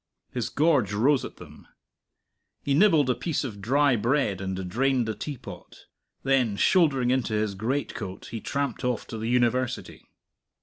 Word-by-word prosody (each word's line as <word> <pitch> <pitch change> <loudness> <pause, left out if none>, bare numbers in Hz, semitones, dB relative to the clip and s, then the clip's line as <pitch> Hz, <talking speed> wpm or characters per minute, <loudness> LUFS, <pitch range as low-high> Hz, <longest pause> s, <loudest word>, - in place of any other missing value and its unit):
His 120 -3 -3
gorge 145 - +2
rose 130 +6 +3
at - - -7
them. - - -14 1.0
He 140 - 0
nibbled 160 -4 +5
a 125 - +3
piece 160 +3 -2
of 105 -7 -6
dry 140 +4 +3
bread 115 -4 0
and 95 -1 -4
drained 130 +4 +1
the 110 - -1
teapot; 140 +2 -9 0.4
then 130 -6 +2
shouldering 135 - +3
into 125 -4 0
his 105 -1 0
greatcoat, 110 -3 -4
he 115 -1 -5
tramped 140 +1 -3
off 125 -2 -1
to 110 - -5
the 110 +1 -3
University. 125 +1 -1
125 Hz, 155 wpm, -26 LUFS, 110-140 Hz, 1.0 s, nibbled